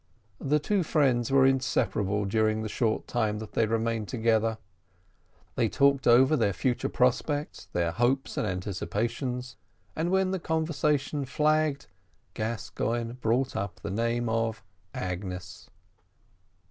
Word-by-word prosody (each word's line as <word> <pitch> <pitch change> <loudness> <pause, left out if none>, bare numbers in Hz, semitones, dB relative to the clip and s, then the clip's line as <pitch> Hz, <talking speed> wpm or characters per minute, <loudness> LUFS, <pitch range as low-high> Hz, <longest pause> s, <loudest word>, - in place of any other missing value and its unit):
The 145 +2 +2
two 195 +6 0
friends 135 -7 +2
were 135 -1 +6
inseparable 105 -6 +1
during 110 +2 +1
the - - -2
short 110 0 -1
time 110 -3 0
that 110 0 -7
they 110 - +1
remained 115 -1 -1
together. 115 -2 +1 1.0
They - - +1
talked 140 -1 +3
over 130 +5 +6
their 105 -7 +1
future 120 +7 -1
prospects, 145 +4 0
their 85 -1 0
hopes 125 +7 0
and - - -1
anticipations, 115 +7 -3 0.4
and 165 +2 -1
when 190 0 +2
the 190 - -1
conversation 150 -3 0
flagged, 150 0 +1 0.5
Gascoigne 115 +1 -2
brought 125 +2 0
up 100 -1 -4
the - - -4
name 115 +3 0
of 115 0 -1 0.3
Agnes. 90 -1 -5
120 Hz, 125 wpm, -28 LUFS, 110-135 Hz, 1.0 s, were